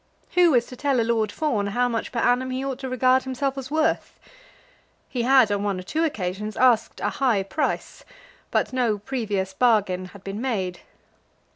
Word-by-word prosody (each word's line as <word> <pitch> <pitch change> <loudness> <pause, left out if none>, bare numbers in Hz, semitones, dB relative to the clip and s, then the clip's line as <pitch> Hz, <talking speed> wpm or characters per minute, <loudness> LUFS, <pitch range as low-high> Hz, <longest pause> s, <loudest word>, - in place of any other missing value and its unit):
Who 350 -5 +5
is 240 -1 +3
to 250 - -10
tell 275 -1 +1
a - - +3
Lord 225 -2 0
Fawn 225 -10 -1
how 245 +5 +1
much 230 -2 -3
per 245 - -6
annum 250 +1 +2
he 260 +1 -3
ought 270 -2 -3
to 265 - -5
regard 255 +1 +3
himself 265 +1 -2
as 265 -1 -6
worth? 310 +1 0 0.9
He 250 - -3
had, 255 -3 +5
on 200 -1 0
one 200 -2 -1
or - - -7
two 310 - -1
occasions, 210 - -3
asked 245 -3 +3
a - - +1
high 240 -8 +1
price, 250 +11 -3 0.5
but - - 0
no 240 -5 +1
previous 205 -5 -3
bargain 205 -5 +2
had 190 +1 -13
been 195 +3 -5
made. 190 -9 -2
240 Hz, 185 wpm, -24 LUFS, 205-260 Hz, 0.9 s, Who